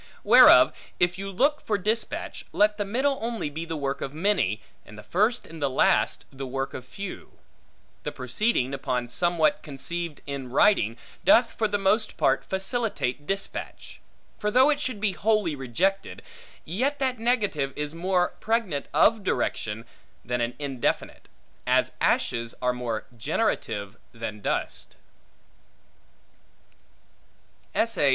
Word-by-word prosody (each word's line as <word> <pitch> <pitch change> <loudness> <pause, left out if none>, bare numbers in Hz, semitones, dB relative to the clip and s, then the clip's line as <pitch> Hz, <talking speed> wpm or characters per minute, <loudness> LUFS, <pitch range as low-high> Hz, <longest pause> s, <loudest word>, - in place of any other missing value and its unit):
Whereof, - - +8 0.3
if 175 +1 +2
you 195 0 -4
look 280 +10 +1
for 210 - 0
dispatch, 215 +4 -2
let 210 0 +3
the 205 - -1
middle 265 +7 0
only 225 -9 -3
be 160 +3 -5
the 165 -1 -4
work 140 -1 -2
of 140 +2 -5
many, 160 - +1 0.2
and 105 - -14
the 105 - -10
first 215 +6 +1
and 160 -1 -11
last 135 -2 +2
the 135 0 -6
work 135 +1 -3
of 125 - -7
few. 195 +7 -8 0.7
The - - -4
proceeding 130 - 0
upon 125 -3 -2
somewhat 170 +2 +2
conceived 155 +3 -5
in 140 -3 -5
writing, 125 - +3 0.3
doth 250 -5 +5
for 220 - 0
the 205 0 0
most 210 +3 +1
part - - +2
facilitate 190 - -2
dispatch: 195 0 -4 0.4
for 210 - 0
though 260 +7 +5
it 290 - 0
should 255 -5 -2
be 205 -1 +1
wholly 195 -2 +1
rejected, 140 +10 -1 0.4
yet 255 - -1
that 260 -3 -1
negative 205 - 0
is 150 0 -4
more 180 +1 +1
pregnant 215 -11 -1
of 220 -2 +4
direction, 110 - -2 0.4
than 125 +1 -1
an 120 +1 -1
indefinite; 135 -4 -2 0.4
as - - +3
ashes 115 0 +1
are 125 0 +1
more 120 -3 -3
generative 110 - -1 0.2
than 115 -2 -6
dust. - - -3
175 Hz, 135 wpm, -26 LUFS, 130-215 Hz, 0.7 s, Whereof